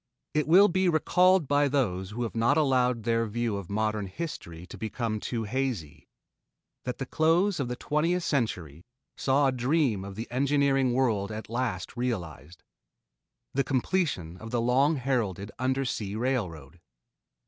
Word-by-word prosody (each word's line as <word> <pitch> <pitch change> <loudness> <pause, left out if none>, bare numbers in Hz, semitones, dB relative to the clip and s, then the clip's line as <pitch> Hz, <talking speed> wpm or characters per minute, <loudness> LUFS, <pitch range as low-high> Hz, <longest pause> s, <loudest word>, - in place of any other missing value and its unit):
It 150 -1 +1
will 190 +6 +7
be 185 -1 +2
recalled 180 +1 +3
by 145 +1 +3
those 95 -10 0
who 115 +4 -4
have 115 - -4
not 115 +6 +3
allowed 125 -5 +2
their 115 0 +1
view 115 0 -1
of 100 -4 -7
modern 105 0 -1
history 90 - -7
to - - -10
become 110 0 -3
too 115 +1 -3
hazy, 110 - -3 0.8
that 125 -1 -3
the 135 - -4
close 165 +7 +2
of 135 - -1
the 125 - -3
twentieth 165 +7 0
century 90 - -2 0.3
saw 140 +1 +2
a 135 - +3
dream 130 -4 +1
of 100 0 -8
the 115 +3 -4
engineering 135 0 +2
world 110 -6 +1
at 110 +1 -7
last 125 0 -2
realized 90 - -4 0.9
the 140 - +2
completion 130 - -1
of 110 +4 -9
the 120 0 0
long 130 +6 +3
heralded 115 - -1
undersea 130 -6 -1
railroad. 90 - -3
125 Hz, 150 wpm, -28 LUFS, 105-140 Hz, 0.9 s, will